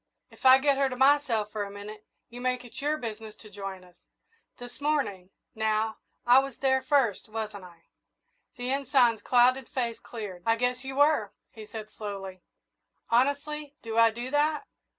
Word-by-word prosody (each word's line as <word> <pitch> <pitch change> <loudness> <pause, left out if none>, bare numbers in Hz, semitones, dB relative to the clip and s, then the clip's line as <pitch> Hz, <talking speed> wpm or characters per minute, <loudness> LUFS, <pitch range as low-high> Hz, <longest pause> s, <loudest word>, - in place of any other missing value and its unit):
If - - -1
I 260 0 +10
get 275 0 +2
her 275 -1 +3
to 255 - -5
myself 265 -6 +3
for 215 - -3
a 200 - -6
minute, 205 +1 -9 0.2
you 245 +1 -10
make 250 0 -1
it 240 - -9
your 300 +2 0
business 220 -4 -7
to 215 -1 -15
join 195 -2 -7
us. 180 -1 -19 0.6
This 245 +2 -11
morning, 270 -12 -1 0.2
now, 220 0 0 0.3
I 245 +2 +7
was 270 -2 -4
there 265 -1 +2
first, 260 -9 +1
wasn't 215 -3 -5
I?" 170 -2 -16 0.7
The 250 +1 -3
Ensign's 260 -5 +2
clouded 255 +1 +3
face 235 -3 -2
cleared. 205 -6 -8
"I 225 +3 +3
guess 250 +2 -1
you 265 0 -6
were," 285 -8 +3 0.2
he 215 -1 -11
said 215 -1 -8
slowly; 195 -3 -7 0.7
"honestly, 285 +4 0
do 225 -1 -5
I 230 0 +6
do 240 +3 -6
that?" 300 +5 +1
240 Hz, 170 wpm, -28 LUFS, 215-270 Hz, 0.7 s, I